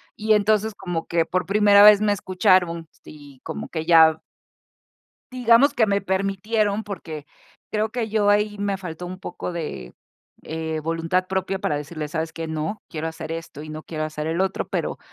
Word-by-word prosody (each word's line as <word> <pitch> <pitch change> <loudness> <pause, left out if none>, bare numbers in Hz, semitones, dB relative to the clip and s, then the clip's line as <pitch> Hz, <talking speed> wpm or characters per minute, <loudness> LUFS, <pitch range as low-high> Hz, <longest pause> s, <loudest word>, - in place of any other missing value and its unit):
y 215 -1 +2
entonces 215 +1 +2
como 175 -4 -4
que 170 -1 +1
por 185 0 -2
primera 205 0 +5
vez 210 0 +8
me 210 -1 +3
escucharon, 180 -3 +1 0.2
sí, 145 -3 -14
como - - -6
que 160 -2 -3
ya 160 -2 +6 1.1
digamos 250 +3 +4
que 230 -6 +2
me 200 0 +1
permitieron, 200 +2 0
porque 165 -7 -7 0.5
creo 215 0 0
que 225 -2 -3
yo 210 -2 +2
ahí 210 0 +2
me 200 -1 -1
faltó 180 -2 -7
un 185 +1 -7
poco 185 - -6
de, 150 - -6 0.5
eh, 160 0 -4
voluntad 165 +3 -1
propia 190 0 -2
para 150 - -1
decirles: 150 0 -6
"¿Sabes 160 0 -3
qué?, 165 0 -4
no, 160 +6 -4
quiero 160 0 -3
hacer 160 0 -6
esto 165 -3 -7
y 155 - -9
no 155 0 -7
quiero 155 -1 -4
hacer 155 0 -5
el 165 +4 0
otro", 190 0 -2
pero - - -3
185 Hz, 180 wpm, -23 LUFS, 160-205 Hz, 1.1 s, vez